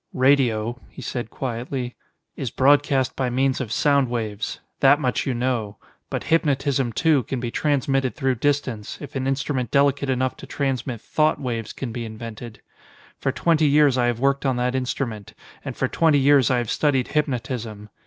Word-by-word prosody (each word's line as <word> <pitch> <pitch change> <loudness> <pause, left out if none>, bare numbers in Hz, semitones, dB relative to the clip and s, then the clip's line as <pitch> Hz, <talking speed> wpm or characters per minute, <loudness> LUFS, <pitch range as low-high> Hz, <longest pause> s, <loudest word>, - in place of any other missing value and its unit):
"Radio," 125 -3 +2
he - - -13
said 120 -3 -4
quietly, 125 0 -4 0.4
"is 130 - -3
broadcast 140 +1 +3
by 130 -2 -1
means 130 +2 +1
of 115 -4 -5
sound 140 0 +2
waves. 110 -3 -3 0.2
That 140 +2 +5
much 125 -4 -1
you 130 - 0
know. 120 -4 -1 0.3
But - - -3
hypnotism 140 -5 +1
too, 155 +3 +3
can 130 +1 -4
be 120 -1 -3
transmitted 135 -2 0
through 135 -3 +1
distance, 135 -7 -1
if 145 - -9
an 135 0 -1
instrument 135 -2 -1
delicate 140 0 +2
enough 130 0 0
to - - -11
transmit 130 -4 -2
thought 155 0 +1
waves 115 -5 -3
can 130 -4 -5
be 120 +1 -4
invented. 115 0 -8 0.6
For - - 0
twenty 160 -2 +2
years 145 -2 +4
I 120 -1 +2
have 120 -1 -1
worked 140 +1 +1
on 135 -2 +1
that 125 +1 0
instrument, 125 -5 -3 0.3
and - - -6
for - - +1
twenty 160 -3 +3
years 140 -2 +5
I 130 - +2
have 120 -3 -2
studied 135 -4 +1
hypnotism. 120 -7 -3
130 Hz, 175 wpm, -23 LUFS, 120-140 Hz, 0.6 s, That